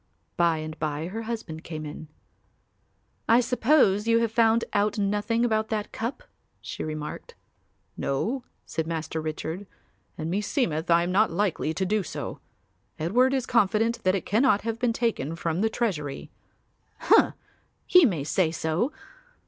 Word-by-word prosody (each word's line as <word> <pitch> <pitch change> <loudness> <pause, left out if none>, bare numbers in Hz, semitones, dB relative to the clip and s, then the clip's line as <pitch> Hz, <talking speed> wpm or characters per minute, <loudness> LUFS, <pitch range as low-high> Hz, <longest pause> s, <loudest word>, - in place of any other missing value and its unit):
By 170 -2 +3
and 155 0 -6
by 155 +2 -2
her 220 +4 -4
husband 220 -9 -5
came 155 -2 -6
in. 150 +1 -8 1.2
"I 230 +2 +7
suppose 235 -4 +3
you 230 0 +5
have 230 -1 +1
found 225 0 +3
out 205 +1 +1
nothing 210 +3 +1
about 220 -2 +1
that 215 -2 -3
cup," 235 - -4 0.4
she - - -6
remarked. 155 -1 -6 0.6
"No," 230 - -1 0.2
said 160 -1 -3
Master 160 -1 -3
Richard, 160 +4 -4 0.5
"and 160 +2 -3
meseemeth 185 - -1
I 170 0 +5
am 175 - -2
not 210 +4 +4
likely 175 -3 0
to 190 +3 0
do 210 +3 +1
so. - - -6 0.6
Edward 240 +12 +3
is 265 -2 0
confident 230 0 +2
that 185 0 +3
it 195 - -3
cannot 220 0 +3
have 230 0 -3
been 245 -2 +2
taken 225 - -1
from 165 +1 -2
the 220 - +2
treasury." 170 - -3 0.7
"Humph! - - +5 0.5
He 360 -1 +7
may 175 - +2
say 160 +3 +1
so. 165 - -1
205 Hz, 150 wpm, -26 LUFS, 160-230 Hz, 1.2 s, I